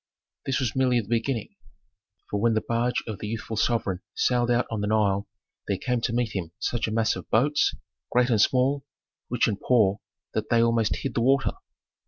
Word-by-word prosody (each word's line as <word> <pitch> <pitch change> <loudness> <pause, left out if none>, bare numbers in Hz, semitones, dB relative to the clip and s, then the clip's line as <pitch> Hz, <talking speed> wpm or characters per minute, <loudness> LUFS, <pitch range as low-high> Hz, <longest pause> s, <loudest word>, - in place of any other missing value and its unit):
This 135 0 +1
was 125 -4 -1
merely 130 -2 +3
the 105 - -5
beginning. 115 0 -2 0.7
For 105 - 0
when 115 0 +3
the 110 - -1
barge 120 +1 0
of 110 -3 -6
the 105 - -5
youthful 110 +1 -4
sovereign 105 -5 0
sailed 120 -1 +2
out 120 +1 +2
on 110 -2 -2
the 105 - -1
Nile 105 -2 +1 0.4
there 100 - 0
came 125 +3 -1
to 115 - -1
meet 115 -2 -1
him 85 -4 -3
such 120 -2 -1
a - - -3
mass 110 0 +1
of - - -9
boats, 145 +6 +2 0.4
great 125 0 +3
and 110 -3 +4
small, 130 +4 +2 0.5
rich 125 - +2
and 100 -3 -2
poor, 105 -5 +3 0.3
that - - -2
they 115 -1 +4
almost 115 -2 +2
hid 135 - -4
the 115 - 0
water. 135 +3 +3
115 Hz, 200 wpm, -26 LUFS, 110-125 Hz, 0.7 s, and